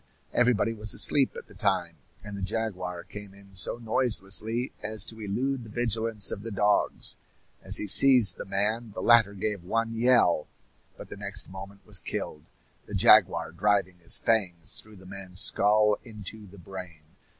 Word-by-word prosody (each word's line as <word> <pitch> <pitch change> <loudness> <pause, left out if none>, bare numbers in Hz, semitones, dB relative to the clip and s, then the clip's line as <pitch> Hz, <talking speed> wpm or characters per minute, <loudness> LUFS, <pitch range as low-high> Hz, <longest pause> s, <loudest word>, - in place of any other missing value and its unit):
Everybody 120 -2 +1
was 105 -1 -1
asleep 135 -3 +2
at - - -9
the - - -19
time, - - -2 0.3
and 105 -1 -9
the 100 - -8
jaguar 95 -4 -5
came 105 -2 -12
in 100 0 -18
so 95 +4 +1
noiselessly 115 0 +1
as 110 -1 -2
to 110 - -9
elude 125 +6 -3
the 110 - -13
vigilance 115 -2 -1
of 100 - -6
the 115 - -7
dogs. 105 0 -1 0.4
As - - +3
he - - 0
seized 120 -3 +7
the - - -8
man, 105 +3 -3
the - - -6
latter 115 -4 +4
gave 100 -1 -4
one 115 +5 -3
yell, 115 -9 +2 0.5
but - - -12
the - - -10
next 100 -2 -2
moment 95 +1 -12
was 105 -4 -2
killed, 75 -1 -7 0.4
the - - -7
jaguar - - +3
driving 95 0 -1
his 85 - +8
fangs 90 -7 -2
through 110 0 -18
the 95 -1 -17
man's 95 -1 -7
skull 105 +1 +2
into 110 -2 -10
the 100 +2 -16
brain. 90 -3 -11
105 Hz, 170 wpm, -26 LUFS, 95-115 Hz, 0.5 s, his